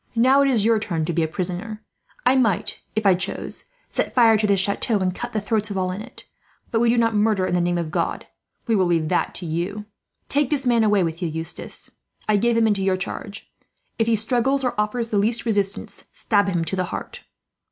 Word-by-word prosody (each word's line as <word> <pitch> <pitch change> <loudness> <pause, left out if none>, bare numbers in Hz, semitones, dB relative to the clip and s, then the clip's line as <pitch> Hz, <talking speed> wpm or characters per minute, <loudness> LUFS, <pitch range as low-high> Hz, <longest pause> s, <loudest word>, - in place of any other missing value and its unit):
Now 260 +4 +5
it 280 - +3
is 225 -6 +2
your 225 -1 +4
turn 170 -7 -2
to 170 - -2
be 170 - +1
a 160 - +1
prisoner. 185 +6 -4 0.4
"I 260 - +5
might, 225 -8 +1
if 220 -1 -1
I 195 - +7
chose, 190 +2 -3 0.3
set - - -2
fire 230 -3 +6
to 215 0 +1
this 200 -1 +3
chateau, 200 +3 +2
and 185 -2 0
cut 240 +6 -5
the 220 - -1
throats 210 0 -1
of 200 - -4
all 185 -1 0
in 190 +3 -5
it; 250 - -12 0.5
but 225 - +1
we 235 0 +3
do 240 - +3
not 230 -1 +2
murder 210 -2 +2
in - - -2
the 180 - +2
name 175 0 0
of 165 -2 -3
God. - - -2 0.4
We 230 - 0
leave 175 -6 +2
that 180 - 0
to 180 - -4
you. 175 +6 -3 0.4
"Take 285 -2 +1
this 280 -3 -1
man 235 -2 +3
away 205 -3 +3
with 165 +1 -3
you, 175 - 0
Eustace. 160 +1 -6 0.4
I 215 -1 +3
give 235 +2 +2
him 230 - +4
into 205 -3 +1
your 190 -1 +2
charge. 200 +2 -7 0.5
If 225 - +2
he 230 - +3
struggles, 250 +5 +1
or 250 - 0
offers 220 +2 -1
the 210 - +1
least 230 +4 +1
resistance, 200 -3 -2
stab 205 -2 +1
him 170 -3 -1
to 190 - -2
the 185 -1 0
heart." - - -7
210 Hz, 230 wpm, -22 LUFS, 185-230 Hz, 0.5 s, I